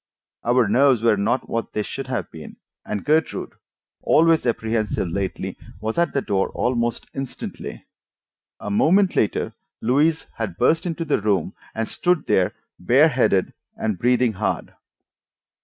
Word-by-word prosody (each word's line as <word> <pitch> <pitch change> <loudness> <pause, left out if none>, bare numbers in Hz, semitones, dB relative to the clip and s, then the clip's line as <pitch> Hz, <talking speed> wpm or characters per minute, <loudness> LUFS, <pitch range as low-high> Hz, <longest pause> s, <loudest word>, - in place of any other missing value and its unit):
Our 120 -1 +3
nerves 125 +1 +4
were 115 -2 +5
not 110 +6 0
what 115 0 -3
they 105 - -1
should 135 +4 -6
have 120 -9 -3
been, - - -10 0.3
and 105 - -4
Gertrude, 155 +1 0 0.5
always 165 -3 +4
apprehensive 110 -4 -1
lately, 95 +2 -3 0.2
was 110 +7 -2
at 170 - +2
the 140 - -1
door 95 -1 0
almost 120 -1 -1
instantly. 135 -1 -6 0.7
A 105 - -5
moment 185 - +3
later 105 - 0 0.3
Louise 150 +7 +2
had 100 -6 -4
burst 160 - +2
into 165 -1 -3
the 145 -8 +1
room 100 -5 0 0.2
and 115 0 -1
stood 175 -4 0
there 90 -1 +2 0.3
bareheaded 125 - +3 0.2
and 105 -5 -2
breathing 125 -1 +2
hard! 90 - -2
120 Hz, 140 wpm, -22 LUFS, 105-140 Hz, 0.7 s, were